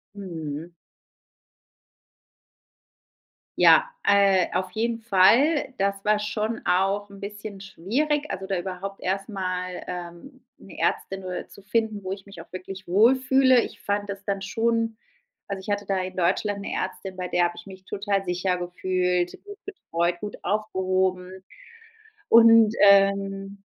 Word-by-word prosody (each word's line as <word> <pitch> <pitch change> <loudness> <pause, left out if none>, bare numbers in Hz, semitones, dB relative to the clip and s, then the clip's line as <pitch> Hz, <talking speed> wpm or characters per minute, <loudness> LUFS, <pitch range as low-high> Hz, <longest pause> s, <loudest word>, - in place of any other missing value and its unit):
Mhm. 165 -4 -6 2.9
Ja, 485 - +7 0.2
äh, 195 -2 +4
auf 185 +1 -2
jeden 230 +1 -1
Fall. 235 - +4
Das 195 0 -1
war 210 0 +3
schon 215 +2 -3
auch 195 +2 +1
'n 200 - -13
bisschen 205 0 -8
schwierig, 285 - -2
also, 190 +1 -5
da 195 - -1
überhaupt 190 +2 -6
erst 195 +2 -2
mal, 185 -3 -4
ähm, 180 +10 -8 0.2
'ne - - -13
Ärztin 195 0 -1
nur 185 -1 -5
zu - - -15
finden, 215 +1 -1
wo 185 - -4
ich 195 -1 -10
mich 200 -4 -11
auch - - -17
wirklich 185 +1 -8
wohl 215 +9 +5
fühle. 260 -1 +4
Ich - - -8
fand 205 0 -2
das 200 0 -6
dann 200 -1 -2
schon 230 +2 -1 0.5
also, 200 -1 -4
ich 190 - -9
hatte 205 0 -1
da 195 0 0
in 185 0 -6
Deutschland 200 +3 0
'ne - - -6
Ärztin, 185 0 -4
bei 180 0 -3
der 175 - +1
habe 175 0 0
ich - - -10
mich 190 -1 -12
total 200 0 -2
sicher 180 0 -1
gefühlt, 180 0 -1
gut 410 0 -11
betreut, 175 - -2
gut 205 -1 -6
aufgehoben. 185 -2 -1 0.9
Und, 230 -1 +7
ähm 195 0 +3
195 Hz, 145 wpm, -25 LUFS, 185-210 Hz, 2.9 s, Ja